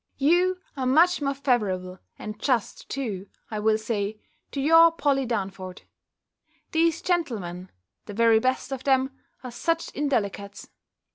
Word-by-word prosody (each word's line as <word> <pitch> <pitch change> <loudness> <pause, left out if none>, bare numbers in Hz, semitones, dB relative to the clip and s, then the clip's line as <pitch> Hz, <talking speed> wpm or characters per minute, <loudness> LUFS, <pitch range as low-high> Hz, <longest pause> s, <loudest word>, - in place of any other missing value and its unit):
You 355 +6 +3 0.2
are 260 -2 -2
much 330 +6 +4
more 275 -1 0
favourable 190 -9 -1 0.2
and 210 0 -7
just 245 -7 -1
too, 205 -8 -4 0.2
I 215 - -2
will 215 +1 +3
say, 215 -1 -3 0.3
to 280 - -4
your 330 +4 +7
Polly 280 -5 +1
Damford. 190 -4 -4 0.9
These 330 +1 +2
gentlemen, 205 - -2 0.4
the 205 - -6
very 230 0 +5
best 255 +3 -1
of 265 -1 -5
them, 265 0 +2 0.3
are 250 - -6
such 330 +7 -1
indelicates! 200 -8 -2
255 Hz, 135 wpm, -26 LUFS, 205-290 Hz, 0.9 s, your